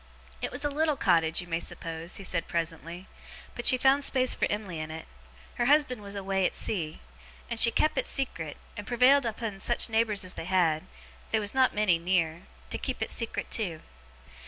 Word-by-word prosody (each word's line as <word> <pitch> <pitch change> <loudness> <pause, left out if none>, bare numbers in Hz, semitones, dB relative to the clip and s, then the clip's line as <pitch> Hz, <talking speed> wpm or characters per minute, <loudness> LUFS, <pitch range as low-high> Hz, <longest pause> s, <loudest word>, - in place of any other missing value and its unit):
'It - - -2
was 290 - -4
a - - +2
little 305 +1 +1
cottage, 165 -3 +3
you 175 - -10
may 165 -1 -1
suppose,' 165 0 -4
he 195 - -4
said, 180 -2 0
presently, 170 +2 -3 0.5
'but 240 - -2
she 255 - +6
found 270 +2 +4
space 255 -2 +3
for - - 0
Em'ly 200 -6 -3
in 155 0 -5
it, 160 +1 -7 0.5
her 240 - +2
husband 285 -5 +3
was 200 0 -7
away 195 -1 -1
at - - +1
sea, 165 -8 -3 0.5
and 230 - -1
she 235 - +8
kep 305 +6 +1
it - - -2
secret, 170 - -3 0.2
and 205 -1 -7
prevailed 250 +2 +4
upon 220 -3 -4
such 240 +4 0
neighbours 220 -3 +1
as 185 - -3
she - - -6
had 175 -2 +1 0.4
(they 220 - +2
was 205 -1 -2
not 260 -1 +3
many 200 -5 +3
near) 170 -1 0 0.2
to - - 0
keep - - -3
it - - -4
secret 230 -2 -3
too. 175 -8 -1
200 Hz, 200 wpm, -28 LUFS, 170-240 Hz, 0.5 s, she